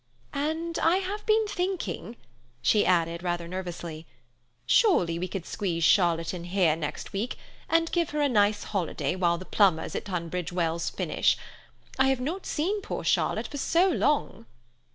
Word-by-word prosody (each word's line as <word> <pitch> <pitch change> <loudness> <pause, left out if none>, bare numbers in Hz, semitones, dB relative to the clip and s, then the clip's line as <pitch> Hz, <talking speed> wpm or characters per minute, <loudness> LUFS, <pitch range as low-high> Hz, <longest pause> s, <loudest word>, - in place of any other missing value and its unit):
"And 320 +4 -2
I 330 +2 +4
have 390 +2 -3
been 435 0 +4
thinking," 365 - -3 0.5
she 210 - +4
added 170 -2 +2
rather 175 -1 -2
nervously, 170 -3 -6 0.6
"surely 180 - +3
we 185 - -2
could 185 -2 -5
squeeze 175 -5 -2
Charlotte 170 -2 +3
in 175 -2 -6
here 175 -3 +2
next 155 -2 -5
week, 215 +6 -2 0.3
and 330 0 +2
give 340 -3 +1
her 300 - -3
a 290 - +4
nice 210 -4 +2
holiday 175 -6 -2
while 170 -2 +2
the 185 - -9
plumbers 185 -7 +2
at - - -3
Tunbridge 180 -2 -3
Wells 170 -2 -1
finish. - - +1 0.6
I 265 - +5
have 265 -1 +2
not 325 +9 -4
seen 390 +7 -1
poor - - -5
Charlotte - - +1
for 285 - -5
so 345 +7 +3
long." 290 - 0
195 Hz, 160 wpm, -27 LUFS, -, 0.6 s, I